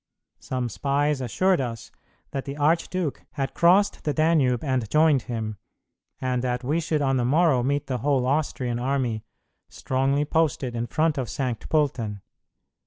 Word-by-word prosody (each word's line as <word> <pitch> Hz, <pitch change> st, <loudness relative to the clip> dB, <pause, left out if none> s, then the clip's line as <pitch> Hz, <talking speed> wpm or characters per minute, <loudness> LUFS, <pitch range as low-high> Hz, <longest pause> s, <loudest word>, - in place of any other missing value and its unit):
Some 125 Hz, -1 st, -3 dB
spies 140 Hz, +3 st, 0 dB
assured 180 Hz, -, +1 dB
us 115 Hz, -3 st, -5 dB, 0.4 s
that 135 Hz, -, -4 dB
the 140 Hz, +1 st, -6 dB
archduke 165 Hz, +1 st, 0 dB
had 135 Hz, -2 st, -3 dB
crossed 190 Hz, +4 st, +3 dB
the 150 Hz, -, -1 dB
Danube 155 Hz, -7 st, +2 dB
and 130 Hz, -6 st, -1 dB
joined 155 Hz, -2 st, +4 dB
him, 110 Hz, -3 st, -4 dB, 0.6 s
and 125 Hz, -1 st, -1 dB
that 125 Hz, 0 st, -1 dB
we 150 Hz, +6 st, 0 dB
should 155 Hz, -2 st, 0 dB
on 135 Hz, -1 st, +2 dB
the 125 Hz, -, +1 dB
morrow 145 Hz, 0 st, +3 dB
meet 140 Hz, +3 st, 0 dB
the 130 Hz, -2 st, -3 dB
whole 135 Hz, 0 st, +1 dB
Austrian 130 Hz, -4 st, -1 dB
army, 125 Hz, -4 st, -1 dB, 0.5 s
strongly 135 Hz, +2 st, 0 dB
posted 145 Hz, -6 st, 0 dB
in 120 Hz, 0 st, -2 dB
front 155 Hz, 0 st, +1 dB
of 125 Hz, -, -3 dB
Saint 125 Hz, -5 st, -3 dB
Pölten. 120 Hz, -10 st, 0 dB
135 Hz, 155 wpm, -25 LUFS, 125-150 Hz, 0.6 s, joined